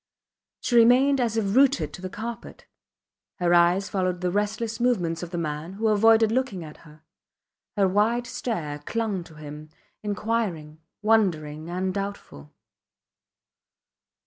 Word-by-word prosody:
She 245 - -1
remained 255 +4 +5
as 230 -2 0
if 200 -2 0
rooted 260 - +3
to - - -9
the 185 - -5
carpet. 230 +4 -7 0.7
Her 175 -1 +1
eyes 175 +3 +4
followed 185 -2 -1
the 180 -1 0
restless 215 +3 -2
movements 180 -10 0
of 175 - -6
the 175 - -5
man, 155 +1 -4
who 220 +3 0
avoided 220 +1 +5
looking 230 -8 -1
at 150 -1 -11
her. 155 -1 -18 0.7
Her 195 -1 +4
wide 220 +5 +1
stare 160 -14 -4
clung 205 +3 -2
to 160 - -15
him, 150 0 -9 0.3
inquiring, 205 -7 -2 0.2
wondering 165 -8 +1
and 185 +1 -2
doubtful. 195 - -6
195 Hz, 135 wpm, -25 LUFS, 165-225 Hz, 0.7 s, remained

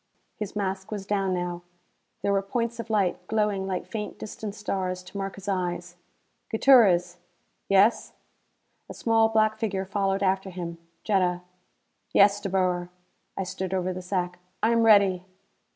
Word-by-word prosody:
His 210 -1 -6
mask 190 -2 -3
was 205 -3 -5
down 195 -2 0
now. 175 -1 -3 0.6
There 200 - +2
were 195 - +2
points 235 +3 -2
of 230 - -6
light, 190 -4 0
glowing 210 -3 0
like 185 -2 -3
faint 210 -2 -5
distant 210 -1 -7
stars, 185 -3 -3
to 180 - -15
mark 195 -1 -4
his 200 0 -11
eyes. 175 -2 -2 0.5
"Gutierrez." 195 -8 +5 0.5
"Yes." 195 +3 +3 0.8
A - - -8
small 225 -1 +3
black 220 0 +2
figure 195 -4 -1
followed 195 0 0
after 190 0 +1
him. 170 -2 -6 0.2
Jetta. 180 -4 +1 0.7
"Yes, 200 +1 +5
De 200 - -3
Boer." 180 -2 0 0.5
I 195 - -1
stood 190 0 -4
over 185 0 -1
the 185 - -6
sack. 180 -1 -2 0.2
"I 225 - +4
am 230 0 +3
ready." 200 -5 +5
195 Hz, 150 wpm, -26 LUFS, 185-210 Hz, 0.8 s, Gutierrez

